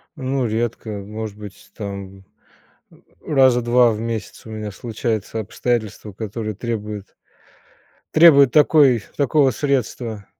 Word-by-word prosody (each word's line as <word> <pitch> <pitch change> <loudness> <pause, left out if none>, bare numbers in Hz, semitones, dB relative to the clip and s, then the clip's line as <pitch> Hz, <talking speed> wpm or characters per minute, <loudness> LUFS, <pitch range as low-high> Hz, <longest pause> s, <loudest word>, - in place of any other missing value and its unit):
Ну 135 -3 -2
редко, 115 0 -2
может 105 +1 -7
быть, 105 -2 -12
там, 100 -2 -7 0.7
э, - - -19 0.3
раза 130 -4 +4
2 120 0 +4
в 105 - -4
месяц 115 -2 -5
у - - -10
меня 110 -1 -5
случаются 115 0 -3
обстоятельства 110 -1 -3
которые 110 +1 -5
требуют 105 -2 -5 1.0
требуют 140 -6 +7
такой 145 -6 +5
такого 140 0 +3
средства. 120 -5 -2
115 Hz, 115 wpm, -20 LUFS, 105-130 Hz, 1.0 s, требуют